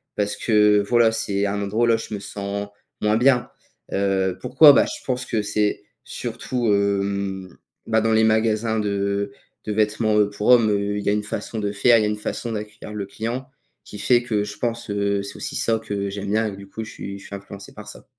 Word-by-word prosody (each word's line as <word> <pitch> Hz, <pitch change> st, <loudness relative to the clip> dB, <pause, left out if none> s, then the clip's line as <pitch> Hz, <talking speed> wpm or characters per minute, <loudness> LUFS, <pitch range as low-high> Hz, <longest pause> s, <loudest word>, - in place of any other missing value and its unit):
parce 105 Hz, 0 st, -1 dB
que, 105 Hz, -2 st, +4 dB
voilà, 120 Hz, -2 st, +4 dB
c'est 100 Hz, -2 st, -1 dB
un 100 Hz, 0 st, -1 dB
endroit 105 Hz, +4 st, 0 dB
où -, -, +4 dB
la 115 Hz, -1 st, +4 dB
je 115 Hz, -, -7 dB
me 105 Hz, -, -3 dB
sens 100 Hz, 0 st, -5 dB, 0.3 s
moins 105 Hz, +1 st, +2 dB
bien. 125 Hz, 0 st, +3 dB, 0.4 s
Heu, 95 Hz, -2 st, 0 dB
pourquoi? 150 Hz, -2 st, +7 dB
Bah, -, -, +5 dB
je -, -, -7 dB
pense 125 Hz, -1 st, -2 dB
que 110 Hz, -3 st, -1 dB
c'est 105 Hz, 0 st, 0 dB, 0.2 s
surtout, 125 Hz, -3 st, -3 dB
hem, 100 Hz, -2 st, -1 dB, 0.3 s
bah, 110 Hz, -, +3 dB
dans 110 Hz, 0 st, +1 dB
les 110 Hz, 0 st, +4 dB
magasins 110 Hz, 0 st, +2 dB
de 100 Hz, +2 st, -1 dB, 0.3 s
de 105 Hz, -, -3 dB
vêtements, 110 Hz, 0 st, +1 dB
heu, 105 Hz, -, +4 dB
pour 105 Hz, +1 st, -4 dB
hommes, 115 Hz, -4 st, +6 dB
heu, 100 Hz, 0 st, 0 dB
il 105 Hz, -, -3 dB
y -, -, +2 dB
a -, -, +3 dB
une 105 Hz, -, 0 dB
façon 110 Hz, +1 st, -5 dB
de 100 Hz, -1 st, -1 dB
faire, 115 Hz, +4 st, +4 dB
il -, -, +1 dB
y 105 Hz, -, +1 dB
a -, -, +1 dB
une 105 Hz, -, -1 dB
façon 115 Hz, +2 st, -4 dB
d'accueillir 105 Hz, 0 st, -7 dB
le 100 Hz, -2 st, -3 dB
client, 115 Hz, +6 st, -4 dB, 0.4 s
qui 105 Hz, -, -10 dB
fait 120 Hz, +2 st, +3 dB
que 105 Hz, -4 st, 0 dB
je 105 Hz, -, -7 dB
pense, 115 Hz, -2 st, -3 dB
heu, 100 Hz, 0 st, 0 dB
c'est 100 Hz, -, -8 dB
aussi -, -, -5 dB
ça 115 Hz, -1 st, +1 dB
que 100 Hz, -3 st, -3 dB
j'aime 100 Hz, 0 st, -5 dB
bien 110 Hz, +1 st, +2 dB
et -, -, -4 dB
que 95 Hz, -, -10 dB
du 100 Hz, -1 st, -11 dB
coup 110 Hz, +3 st, -6 dB
je 110 Hz, -, -9 dB
suis 100 Hz, 0 st, -7 dB
je -, -, -14 dB
suis 100 Hz, -, -7 dB
influencé 100 Hz, 0 st, -10 dB
par -, -, -11 dB
ça. -, -, -11 dB
105 Hz, 235 wpm, -22 LUFS, 100-110 Hz, 0.4 s, pourquoi